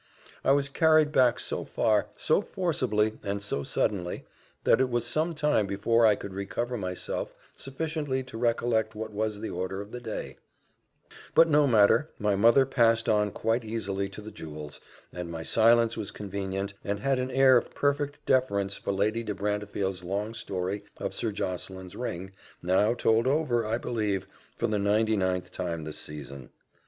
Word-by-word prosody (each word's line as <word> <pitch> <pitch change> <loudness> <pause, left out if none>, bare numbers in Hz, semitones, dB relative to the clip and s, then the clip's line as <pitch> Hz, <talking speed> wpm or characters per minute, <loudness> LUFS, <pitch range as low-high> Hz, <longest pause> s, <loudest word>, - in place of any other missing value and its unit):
I - - +4
was 140 0 +3
carried 155 +1 +4
back 125 -5 +4
so - - -2
far, 105 -2 +1
so 160 - +2
forcibly, 130 - 0
and 100 0 -2
so 100 -8 -2
suddenly, 90 +4 -1 0.4
that 120 - +4
it 130 - +2
was 120 -1 0
some 160 +2 0
time 150 -9 +2
before 110 +4 +3
I 105 - +5
could 100 -1 -8
recover 110 +6 -3
myself 90 -5 -4 0.2
sufficiently 145 -1 -3
to 130 -2 -12
recollect 115 -1 0
what 110 0 -5
was 105 0 -2
the 110 - -4
order 95 +2 -3
of 100 +1 -8
the 125 - -6
day; 115 -3 -6 1.0
but 165 +1 +7
no 150 -1 +5
matter 115 +6 +4
my 105 -2 +1
mother 115 +7 +5
passed 115 -3 +2
on 105 -1 +3
quite 115 +4 -1
easily 100 -3 -3
to 100 - -9
the 110 +1 -9
jewels, 75 -2 -8 0.3
and 90 -1 -5
my 80 -1 -5
silence 115 +3 +4
was 110 -3 -4
convenient, 100 0 -4
and 100 0 -3
had 135 +2 +1
an 130 0 -2
air 130 0 +5
of 120 - 0
perfect 145 0 -1
deference 100 -7 +1
for - - -3
Lady 105 +4 0
de 105 -3 -4
Brantefield's 100 -2 -2
long 100 +5 -3
story 100 -2 -3
of - - -4
Sir 115 - -1
Josseline's 95 -1 -5
ring, 95 -6 -5 0.3
now 100 +6 +3
told 115 0 +2
over, 130 -6 +1
I 115 +1 0
believe, 105 -6 -2 0.3
for - - -1
the 110 -2 0
ninety 110 +2 +2
ninth 95 -2 -1
time 85 -3 -4
this 75 0 -6
season. 70 -3 -8
110 Hz, 170 wpm, -28 LUFS, 100-125 Hz, 1.0 s, but